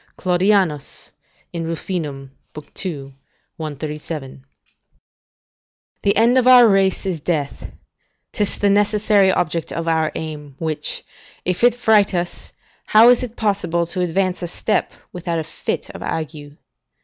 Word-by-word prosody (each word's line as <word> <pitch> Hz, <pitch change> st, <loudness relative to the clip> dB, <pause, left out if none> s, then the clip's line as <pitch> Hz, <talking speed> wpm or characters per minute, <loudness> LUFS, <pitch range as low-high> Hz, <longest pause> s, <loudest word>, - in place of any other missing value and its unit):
Claudianus, 180 Hz, -4 st, 0 dB, 0.4 s
in 170 Hz, -1 st, -3 dB
Ruf., 165 Hz, -1 st, -5 dB
ii. 185 Hz, -2 st, 0 dB
137.] 145 Hz, 0 st, -8 dB, 1.6 s
The 200 Hz, -, +2 dB
end 235 Hz, +4 st, +5 dB
of 250 Hz, -, +1 dB
our 250 Hz, -2 st, +9 dB
race 195 Hz, -2 st, +2 dB
is 180 Hz, -4 st, -2 dB
death; 145 Hz, -3 st, -3 dB, 0.6 s
'tis 210 Hz, -3 st, -1 dB
the 200 Hz, -1 st, +2 dB
necessary 205 Hz, -1 st, +3 dB
object 165 Hz, -3 st, -1 dB
of 165 Hz, 0 st, -4 dB
our 160 Hz, -1 st, +1 dB
aim, 150 Hz, -3 st, -6 dB
which, 160 Hz, -2 st, -2 dB, 0.4 s
if 180 Hz, +4 st, 0 dB
it 245 Hz, -1 st, +5 dB
fright 215 Hz, -5 st, +3 dB
us, 175 Hz, 0 st, -4 dB, 0.4 s
how 220 Hz, +3 st, +7 dB
is 245 Hz, -, +5 dB
it 245 Hz, -2 st, -6 dB
possible 185 Hz, -5 st, 0 dB
to 180 Hz, +2 st, -4 dB
advance 185 Hz, +1 st, 0 dB
a 175 Hz, -, -3 dB
step 170 Hz, -, -1 dB, 0.2 s
without 175 Hz, -1 st, -3 dB
a 160 Hz, -, -1 dB
fit -, -, -4 dB
of -, -, -10 dB
ague? 150 Hz, -2 st, -5 dB
175 Hz, 130 wpm, -20 LUFS, 155-200 Hz, 1.6 s, our